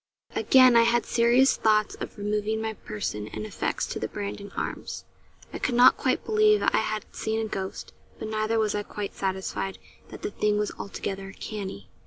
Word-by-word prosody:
Again 255 -2 +6
I 230 - +8
had 235 0 +3
serious 240 +3 +4
thoughts 215 -1 +2
of - - -7
removing 210 +1 -1
my 220 0 -2
person 105 - -5
and 215 - -6
effects 215 - -2
to - - -5
the - - -2
Brandon 200 0 -6
Arms. - - -4 0.5
I - - -4
could 250 - 0
not 245 +1 +8
quite - - 0
believe 430 -1 +4
I - - +3
had 215 0 -1
seen 220 0 -1
a 220 - -1
ghost; 190 -2 -5 0.2
but 220 - -5
neither 215 +1 0
was 215 -2 +1
I 205 - -1
quite 205 0 -6
satisfied 190 0 -3 0.3
that - - -10
the - - -2
thing 210 0 +1
was 210 0 0
altogether 195 -1 -5
canny. 195 - -6
215 Hz, 185 wpm, -26 LUFS, 200-230 Hz, 0.5 s, I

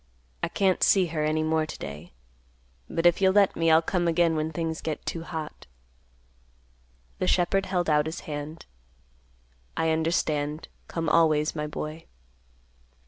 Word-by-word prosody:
"I - - 0
can't 190 -2 +1
see 190 -2 +5
her 155 -2 0
any 155 +1 +1
more 155 0 +1
to - - -7
day. 75 +5 -8 0.8
But 165 - -2
if 175 +2 +4
you'll 190 -1 +4
let 200 -1 +4
me, 165 0 +2
I'll 160 +1 +5
come 175 0 0
again 170 -1 +2
when 155 +1 -1
things 160 0 -3
get 155 -2 -4
too 165 - -3
hot." 160 - -7 1.5
The 185 - 0
shepherd 190 +2 +2
held 180 -2 0
out 150 -1 +3
his 160 - -5
hand, 150 +1 -7 1.1
"I 160 0 +2
understand. 155 -2 -1 0.2
Come 165 -1 -3
always, 155 -1 +3
my 150 -1 -2
boy." 155 +2 -6
160 Hz, 150 wpm, -26 LUFS, 155-170 Hz, 1.5 s, see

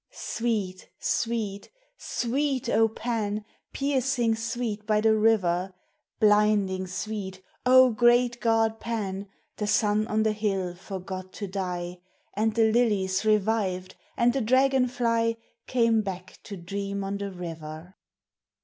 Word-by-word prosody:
Sweet, 210 -6 -3
sweet, 220 -4 -2 0.3
sweet, 265 +1 -1
O 225 -1 +4
Pan, 215 -2 -3 0.3
Piercing 265 -4 +1
sweet 225 -2 -3
by 215 -1 +3
the 220 0 +4
river! 190 -4 +2 0.4
Blinding 210 -3 +3
sweet, 190 0 -5 0.2
O 255 0 +7
great 240 +1 +3
god 225 -1 +2
Pan! 200 -4 -3 0.3
The 210 - -2
sun 210 0 +2
on 215 0 +1
the 220 - +2
hill 195 -4 -1
forgot 185 0 -7
to 205 - -5
die, 180 -2 -4 0.3
And 215 +1 0
the 225 -1 +4
lilies 205 -5 +1
revived, 205 -3 +1 0.2
and 240 0 +3
the 270 - 0
dragon 260 +2 +3
fly 230 -2 0 0.3
Came 230 -3 +3
back 185 -2 -7
to 200 - -7
dream 200 +3 -4
on 200 +1 -3
the 200 0 -3
river. 165 -1 -8
215 Hz, 125 wpm, -27 LUFS, 190-230 Hz, 0.4 s, O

